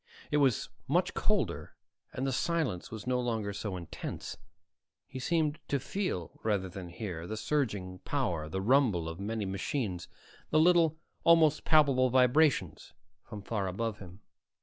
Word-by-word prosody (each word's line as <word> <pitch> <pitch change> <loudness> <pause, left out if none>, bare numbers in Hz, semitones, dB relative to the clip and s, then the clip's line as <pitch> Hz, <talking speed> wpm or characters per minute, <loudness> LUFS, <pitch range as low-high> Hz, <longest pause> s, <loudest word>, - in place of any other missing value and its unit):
It 150 - +3
was 135 -5 +2 0.2
much - - +1
colder - - -1 0.4
and 130 - -3
the 135 - 0
silence 140 - -1
was 110 -2 -7
no 125 0 +1
longer 110 -4 -2
so 100 -1 -4
intense. 85 -2 -6 0.7
He 130 - -8
seemed 155 +1 0
to 140 - 0
feel, 135 - -3
rather 100 -4 0
than 90 -1 -8
hear, 85 -3 -6
the 110 - -4
surging 105 -8 -1
power, 90 - -2
the 95 +4 -2
rumble 110 -7 +3
of 80 +2 -6
many 105 +1 -2
machines, 95 -2 -3 0.4
the 155 - +4
little, 165 -1 +4 0.3
almost 160 -2 +5
palpable 140 -5 +5
vibrations 130 +3 +2 0.3
from 105 -3 -9
far 100 -4 -2
above 105 +3 -3
him. 90 +1 -12
115 Hz, 150 wpm, -31 LUFS, 95-145 Hz, 0.7 s, almost